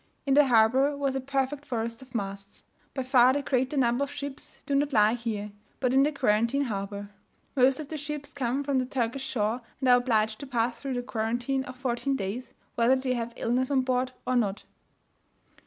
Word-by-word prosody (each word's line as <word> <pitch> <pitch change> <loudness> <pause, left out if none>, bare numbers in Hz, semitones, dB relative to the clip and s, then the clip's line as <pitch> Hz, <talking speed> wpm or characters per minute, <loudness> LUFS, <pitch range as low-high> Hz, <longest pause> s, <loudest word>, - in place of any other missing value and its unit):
In 275 - +2
the 290 0 +6
harbour 255 +5 +4
was 275 -1 0
a 265 - -1
perfect 275 +1 -1
forest 230 -2 -3
of 255 -2 -14
masts. 200 -1 -5 0.3
By 265 - -1
far 255 0 +5
the 285 +1 -1
greater 260 +2 0
number 245 +1 +2
of 280 - -3
ships 285 -1 -6
do 280 - -2
not 280 +1 +1
lie 215 -1 +5
here, 220 -3 -3 0.3
but 255 -1 +1
in 265 - +5
the 295 +2 +3
quarantine 245 0 +2
harbour. 200 -3 -4 0.4
Most 265 +1 +4
of 300 -2 -6
the 315 - -4
ships 295 -1 -5
come 265 0 -1
from 275 -2 +1
the 255 - 0
Turkish 255 +1 -2
shore, 225 +1 -1 0.2
and 265 - 0
are 245 0 +7
obliged 220 -3 +1
to 280 - -7
pass 235 -2 -1
through 270 -3 -3
a 245 - -2
quarantine 240 +3 -1
of 255 - -8
fourteen 255 +1 -1
days, 230 +3 -4 0.2
whether 240 +2 +4
they 260 -1 -1
have 235 -1 -3
illness 250 +2 0
on 275 -2 +3
board 255 0 0
or 255 - 0
not. 210 -4 0
255 Hz, 205 wpm, -28 LUFS, 230-275 Hz, 0.4 s, are